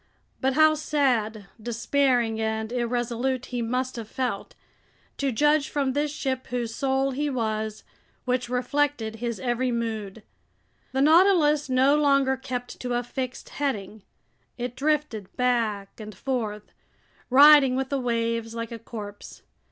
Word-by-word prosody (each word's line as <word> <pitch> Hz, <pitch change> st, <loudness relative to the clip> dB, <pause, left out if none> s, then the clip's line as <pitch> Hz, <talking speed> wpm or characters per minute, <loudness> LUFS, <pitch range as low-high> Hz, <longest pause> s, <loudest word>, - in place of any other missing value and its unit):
But 265 Hz, 0 st, +1 dB
how 310 Hz, +2 st, +6 dB
sad, 250 Hz, -9 st, 0 dB, 0.2 s
despairing, 240 Hz, 0 st, +1 dB
and 220 Hz, 0 st, -2 dB
irresolute 245 Hz, +1 st, -1 dB
he 245 Hz, -1 st, -4 dB
must 250 Hz, +2 st, -2 dB
have 225 Hz, -2 st, -6 dB
felt, 245 Hz, -4 st, -3 dB, 0.6 s
to 275 Hz, -1 st, 0 dB
judge 295 Hz, +4 st, +2 dB
from 275 Hz, -3 st, 0 dB
this 295 Hz, +2 st, 0 dB
ship 265 Hz, -3 st, -3 dB
whose 240 Hz, -2 st, -3 dB
soul 270 Hz, +1 st, 0 dB
he 290 Hz, +3 st, -1 dB
was, 220 Hz, -4 st, -2 dB, 0.4 s
which 250 Hz, -1 st, -1 dB
reflected 250 Hz, -2 st, -1 dB
his 235 Hz, -2 st, -3 dB
every 250 Hz, 0 st, 0 dB
mood! 225 Hz, -3 st, -4 dB, 0.7 s
The 265 Hz, -, 0 dB
Nautilus 310 Hz, -3 st, +4 dB
no 260 Hz, +3 st, +4 dB
longer 275 Hz, -2 st, +3 dB
kept 255 Hz, -2 st, -6 dB
to 245 Hz, -1 st, -2 dB
a 240 Hz, -, 0 dB
fixed 255 Hz, +1 st, -5 dB
heading. 220 Hz, -7 st, -3 dB, 0.6 s
It 245 Hz, 0 st, -4 dB
drifted 280 Hz, -8 st, -1 dB
back 230 Hz, -6 st, 0 dB
and 215 Hz, -1 st, -8 dB
forth, 220 Hz, -6 st, -4 dB, 0.6 s
riding 280 Hz, 0 st, +8 dB
with 265 Hz, 0 st, -1 dB
the 275 Hz, -, 0 dB
waves 230 Hz, -1 st, -1 dB
like 230 Hz, 0 st, -4 dB
a 230 Hz, -, -6 dB
corpse. 210 Hz, -2 st, -9 dB
250 Hz, 135 wpm, -25 LUFS, 230-275 Hz, 0.7 s, riding